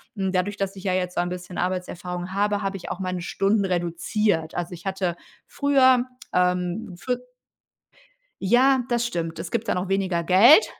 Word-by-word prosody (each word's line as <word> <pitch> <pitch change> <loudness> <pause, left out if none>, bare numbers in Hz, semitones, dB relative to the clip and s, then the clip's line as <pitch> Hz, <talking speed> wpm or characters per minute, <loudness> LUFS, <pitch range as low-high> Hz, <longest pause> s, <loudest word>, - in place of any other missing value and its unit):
hm, 190 -2 -1
dadurch, 195 +2 0
dass 195 -1 -3
ich 190 - -9
ja 185 - +1
jetzt 180 -1 -1
so - - 0
ein 175 - -2
bisschen 180 0 -7
Arbeitserfahrung 180 0 -3
habe, 205 +1 0
habe 195 0 -2
ich 185 - -8
auch 185 - -4
meine 185 -1 -3
Stunden 200 +2 +1
reduziert. 175 0 0
Also, 175 0 -3
ich 175 +2 -11
hatte 190 -3 -1 0.3
früher, 260 -3 +4 0.3
ähm, 180 +2 0
für 250 +6 -2 1.2
Ja, 255 +6 +4
das 240 -1 +1
stimmt. 165 -7 -3
Es 165 0 -5
gibt 230 - -2
dann - - +1
auch 180 +1 -3
weniger 190 -3 0
Geld, 230 - +7
185 Hz, 180 wpm, -24 LUFS, 180-205 Hz, 1.2 s, Geld